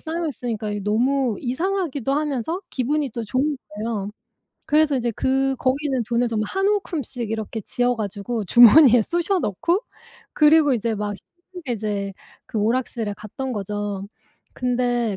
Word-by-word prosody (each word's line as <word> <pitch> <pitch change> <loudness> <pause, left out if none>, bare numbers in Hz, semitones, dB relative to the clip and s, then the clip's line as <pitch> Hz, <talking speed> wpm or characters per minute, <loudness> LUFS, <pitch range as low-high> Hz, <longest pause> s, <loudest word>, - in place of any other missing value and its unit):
쌓여 330 +1 -3
있으니까 235 -7 -4
이게 205 0 -3
너무 240 +3 +1
이상하기도 290 - -1
하면서 295 - -1
기분이 280 +2 -1
또 230 +1 -5
좋은 270 +6 0
거예요. 210 -1 -3 0.6
그래서 300 -1 +3
이제 240 -2 0
그 270 0 +1
거기 270 +3 0
있는 265 -4 0
돈을 240 0 +1
정말 215 -2 -1
한 385 0 0
움큼씩 290 - -2
이렇게 220 0 -4
쥐어 245 +3 0
가지고 210 +1 -3
주머니에 240 - +8
쑤셔 345 - 0
넣고 325 - 0 0.5
그리고 300 -1 +5
이제 230 -1 -1
막 205 0 -3
신나게 350 - -9
이제 205 -3 -3 0.3
그 220 - -3
오락실에 225 -1 -1
갔던 255 +5 -5
거죠. 205 -1 -4 0.5
근데 245 -3 0
245 Hz, 330 characters per minute, -22 LUFS, 215-295 Hz, 0.6 s, 주머니에